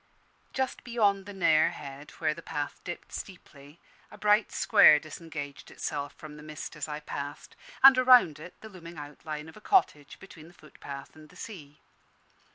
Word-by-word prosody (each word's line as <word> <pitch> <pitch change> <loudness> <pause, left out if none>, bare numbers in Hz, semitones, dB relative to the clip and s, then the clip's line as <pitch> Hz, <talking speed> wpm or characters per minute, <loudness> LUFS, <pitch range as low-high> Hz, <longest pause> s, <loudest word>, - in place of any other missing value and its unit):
Just 265 -1 -3
beyond 205 -5 +1
the - - -7
Nare 160 -5 +3
Head, 140 0 -9
where 155 -2 +1
the - - -11
path 145 -1 -5
dipped 175 - -8
steeply, 150 -5 -10 0.3
a 210 - -13
bright 210 +1 +3
square 150 - +6
disengaged 155 -2 -8
itself 145 -1 -5
from 150 -1 -11
the - - -11
mist 155 +1 -8
as 150 - -5
I 150 0 -5
passed, 145 -1 -7 0.3
and, 270 -1 +11
around 250 - +6
it, 175 +3 -11
the 220 - -10
looming 170 -4 -11
outline 150 +1 -7
of 160 - -13
a - - -14
cottage, 180 - +1
between 165 -5 -13
the 175 - -18
footpath 140 -2 -11
and 155 -1 -15
the - - -19
sea. 150 -9 -10
155 Hz, 170 wpm, -29 LUFS, 150-195 Hz, 0.3 s, and